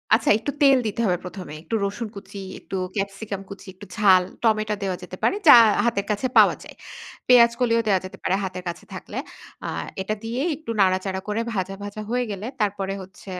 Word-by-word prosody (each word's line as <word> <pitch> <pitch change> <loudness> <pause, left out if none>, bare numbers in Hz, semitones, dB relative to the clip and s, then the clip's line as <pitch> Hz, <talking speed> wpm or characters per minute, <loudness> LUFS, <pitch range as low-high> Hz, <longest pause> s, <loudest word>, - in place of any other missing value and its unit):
আচ্ছা 225 - 0
একটু 285 - -3
তেল 275 -1 +7
দিতে 215 +2 -2
হবে 180 -2 +2
প্রথমে। 180 -3 -8
একটু 225 - -3
রসুন 215 +3 -4
কুচি, 200 0 -9 0.2
একটু - - -7 0.2
ক্যাপসিকাম 200 0 -4
কুচি, 200 0 -10
একটু 200 +2 -12
ঝাল 190 -4 +6 0.2
টমেটো 215 -2 +2
দেয়া 190 -2 -1
যেতে 185 +1 -9
পারে 390 - +3
যা - - +12 0.3
হাতের 200 -4 0
কাছে 210 +5 0
পাওয়া - - +7
যায়। - - -12 0.5
পেঁয়াজ 235 -2 +7
কলিও 230 -2 +3
দেওয়া 195 -2 +3
যেতে 190 +1 -9
পারে 190 - +1
হাতের 185 -1 -5
কাছে 170 - -8
থাকলে। - - -8 0.5
আ - - -2 0.3
এটা 215 +3 -2
দিয়ে 235 +3 -3
একটু 280 -5 -7
নাড়াচাড়া 190 0 +1
করে 210 +2 -1
ভাজা 195 0 -2
ভাজা 205 +1 -6
হয়ে 245 +1 0
গেলে 200 +2 -5
তারপরে 195 -2 -1
হচ্ছে 190 +1 -12
200 Hz, 195 wpm, -23 LUFS, 190-225 Hz, 0.5 s, যা